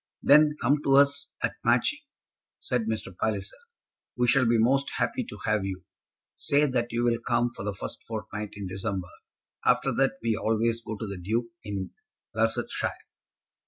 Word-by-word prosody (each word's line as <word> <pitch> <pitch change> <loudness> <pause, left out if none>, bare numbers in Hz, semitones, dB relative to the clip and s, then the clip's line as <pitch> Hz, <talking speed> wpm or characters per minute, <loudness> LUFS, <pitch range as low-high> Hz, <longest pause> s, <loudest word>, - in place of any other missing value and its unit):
"Then 150 +1 +6
come 145 +1 +2
to 135 - +4
us 140 0 +4
at - - +1
Matching," - - +3 0.6
said 125 -3 -1
Mr. 110 -4 -3
Palliser. 100 -1 -1 0.6
"We 125 0 +2
shall 130 0 +4
be 115 0 +4
most 135 +5 +3
happy - - 0
to - - -9
have 110 -2 +2
you. 95 -2 -4 0.5
Say 145 +1 +2
that 120 -4 -1
you'll 120 0 +1
come 120 +1 +1
for 120 - -7
the 100 -1 -3
first - - -6
fortnight 105 -2 -5
in 100 -1 -6
December. 95 -1 -3 0.5
After - - +3
that 135 0 +2
we 115 -1 +2
always 115 +2 0
go 110 -2 -5
to 110 - -4
the 100 -2 -5
Duke, 115 +6 -1
in 100 -2 -4 0.4
Barsetshire. - - 0
115 Hz, 160 wpm, -27 LUFS, 105-125 Hz, 0.6 s, Then